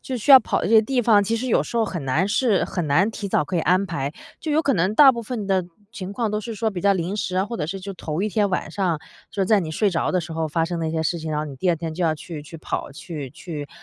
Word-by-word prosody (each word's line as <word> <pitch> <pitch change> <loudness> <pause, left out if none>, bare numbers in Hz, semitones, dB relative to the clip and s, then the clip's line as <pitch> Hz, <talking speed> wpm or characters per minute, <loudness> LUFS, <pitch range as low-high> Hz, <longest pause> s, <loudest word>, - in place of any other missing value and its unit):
就 260 - -4
需 245 +5 -1
要 265 -1 +11
跑 - - -1
的 - - 0
这 - - -2
些 220 - +8
地 250 +2 0
方， 210 -3 +5
其 225 +3 0
实 255 - -3
有 - - +3
时 - - -6
候 225 - +3
很 170 -9 -5
难 155 +9 +2
是 210 0 +2
很 175 -4 -3
难 180 +10 +3
提 205 -2 -5
早 150 - +2
可 175 +5 -3
以 - - +2
安 185 +4 +2
排。 145 -6 -3 0.3
就 315 - -4
有 310 +2 +3
可 275 - +2
能 185 +1 +1
大 270 +1 +8
部 235 - -4
分 220 -2 -4
的 190 -1 +2 0.3
情 190 -4 -6
况 220 +1 -2
都 210 0 -1
是 230 0 -6
说 220 +1 -1
比 185 -4 -5
较 200 +1 +3
临 180 +1 -2
时 185 -1 -2
啊， 190 - +2
或 235 +3 -6
者 150 - -1
是 195 +3 -4
就 195 +1 -6
头 165 0 -4
1 215 - 0
天 205 -1 +2
晚 185 -3 -2
上 175 -4 0 0.3
就 200 -3 -1
是 - - 0
在 210 0 +4
你 160 - -4
睡 200 +5 +1
着 170 - 0
的 185 - +1
时 165 - -7
候 160 -1 -2
发 165 +2 0
生 170 0 -3
的 160 - -1
一 - - -2
些 160 0 -1
事 170 +2 -1
情， 155 0 -5
然 150 - -1
后 150 - -1
你 145 -3 -7
第 180 +8 -1
2 170 - +3
天 160 0 -5
就 180 - -4
要 160 -2 +2
去 155 -1 -8
去 165 +2 -10
跑， 155 - -4
去 145 -1 -7
去 150 -1 -7
185 Hz, 345 characters per minute, -23 LUFS, 160-215 Hz, 0.3 s, 要